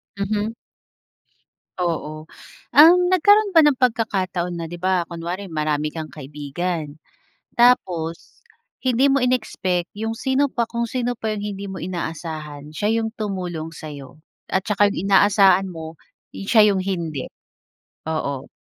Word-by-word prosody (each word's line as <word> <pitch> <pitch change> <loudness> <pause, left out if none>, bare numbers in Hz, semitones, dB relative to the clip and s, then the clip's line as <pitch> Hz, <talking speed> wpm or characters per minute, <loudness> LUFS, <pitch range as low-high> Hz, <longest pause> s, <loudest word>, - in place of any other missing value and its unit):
Mhm. 205 +2 -2 1.2
Oo. 155 -3 -3 0.5
Um, 325 +5 +8
nagkaroon 410 +3 +5
ba 335 - +6
ng 295 -2 +4
pagkakataon 195 -8 0
na 170 -1 -4
'di 175 - -7
ba, 185 0 +1
kunwari 175 +3 -5
marami 150 -1 -1
kang 160 -1 -6
kaibigan 150 +2 -5 0.6
tapos 180 -9 +1 0.4
hindi 260 +2 +2
mo 275 - +3
in-expect 215 -8 -1
'yong 225 +1 -3
sino 265 +4 +1
pa, 240 -3 -1
kung 235 0 -2
sino 245 0 -2
pa 220 -1 -2
yung 205 - -5
hindi 200 -1 -5
mo 190 -1 -6
inaasahan 155 -4 -6
siya 210 +8 0
yung 225 - -2
tumulong 180 -6 -4
sa'yo 145 -2 -10 0.3
at 190 - 0
saka 205 0 +3
'yong 200 -3 -3
inaasahan 195 -1 +5
mo, 160 -2 -8 0.3
eh, 195 - -8
siya 210 -2 +6
'yong 195 - 0
hindi? 165 -8 -3 0.8
Oo. 140 -4 -3
185 Hz, 135 wpm, -22 LUFS, 160-225 Hz, 1.2 s, Um